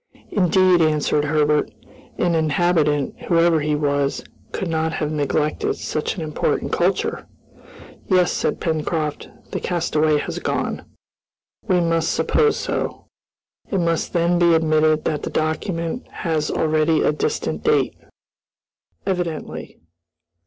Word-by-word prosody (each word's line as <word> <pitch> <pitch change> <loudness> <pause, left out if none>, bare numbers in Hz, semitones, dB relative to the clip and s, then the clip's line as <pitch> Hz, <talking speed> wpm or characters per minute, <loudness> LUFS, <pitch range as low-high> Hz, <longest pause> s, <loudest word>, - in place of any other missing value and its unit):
"Indeed," 185 -2 +4
answered 150 -1 +2
Herbert, 150 0 +2 0.5
"an 175 -1 +1
inhabitant, 155 -2 +1
whoever 170 -1 +4
he 150 0 0
was, 145 -1 0 0.3
could 190 - -3
not 160 0 -1
have 150 -1 -2
neglected 150 0 0
such 155 - -3
an 170 - -4
important 155 -1 -1
culture!" - - 0 0.8
"Yes," 185 -1 +4
said - - -1
Pencroft, 155 -2 -2 0.2
"the - - -2
castaway 155 -3 +1
has - - -4
gone." - - -2 0.8
"We 185 -3 +3
must 165 -1 +1
suppose 445 -2 +2
so." - - -3 0.6
"It 195 - 0
must 170 -1 0
then 175 0 +2
be 170 -1 +5
admitted 155 -1 +2
that 150 - -1
the - - -4
document 165 +6 -2
has 155 -3 -2
already 155 0 +2
a - - +3
distant 150 - -2
date?" 450 -1 +2 1.1
"Evidently." 175 -4 -3
160 Hz, 120 wpm, -21 LUFS, 150-175 Hz, 1.1 s, be